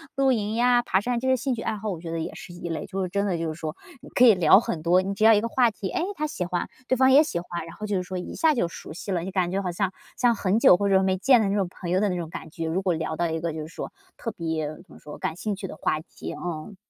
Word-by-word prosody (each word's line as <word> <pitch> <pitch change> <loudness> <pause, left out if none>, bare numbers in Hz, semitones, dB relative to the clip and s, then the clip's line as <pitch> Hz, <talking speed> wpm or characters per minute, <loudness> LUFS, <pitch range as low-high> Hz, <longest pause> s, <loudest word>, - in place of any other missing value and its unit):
露 270 -1 +3
营 215 -3 0
呀、 245 +1 +4
爬 190 - +2
山 245 +2 -1
这 260 - -3
些 260 - +4
兴 255 +1 -1
趣 230 - -5
爱 - - -1
好， 215 +1 -4
我 180 -5 -4
觉 165 -1 -6
得 165 - -2
也 165 +2 -4
是 175 - -10
一 175 0 -6
类。 165 - -3
就 195 0 -3
是 185 - -1
真 200 +2 0
的 190 -3 0
就 165 - -2
是 155 - -3
说， 155 0 -4 0.3
你 - - -12
可 250 - +5
以 225 -4 +8
聊 185 +2 +6
很 170 -7 -3
多。 175 +2 +4
你 195 +1 -3
只 215 - -1
要 225 0 +8
一 210 - +4
个 230 - -1
话 240 0 +3
题， 205 -2 -5
哎， 330 - -1
他 305 -2 -1
喜 195 - -4
欢， 175 0 -2 0.2
对 260 - +2
方 260 +1 +5
也 285 +3 +8
喜 235 - -3
欢， 175 -1 -5
然 165 - -10
后 215 - -6
就 205 - -1
是 180 - -1
说 185 +1 -5
一 180 - -7
下 320 -2 +3
就 230 - +1
熟 170 - -10
悉 195 +4 -6
了， 175 -3 0
就 190 - -5
感 180 -2 0
觉 195 +1 0
好 180 -2 -2
像， 185 +2 -1 0.3
像 245 -2 +3
很 200 +1 +1
久 205 - +7
或 200 - 0
者 190 -1 +5
没 190 0 +1
见 250 +6 +5
的 205 - +1
那 200 - 0
种 195 -3 +1
朋 175 -1 -7
友 185 - +3
的 205 0 +2
那 180 - -1
种 165 -2 -4
感 160 - -8
觉， 165 +1 -4
如 175 +4 0
果 185 -2 +2
聊 160 -1 -3
到 170 +2 0
一 160 0 -2
个 165 0 -2
就 160 - -5
是 155 - -6
说 170 - -7 0.3
特 230 - -4
别 160 -2 -2
怎 165 +5 -11
么 - - -13
说 150 0 -10
感 160 - -2
兴 205 +3 -3
趣 195 -1 -6
的 - - -9
话 - - 0
题， 160 - -8
嗯。 175 +3 -6
190 Hz, 360 characters per minute, -25 LUFS, 170-220 Hz, 0.3 s, 以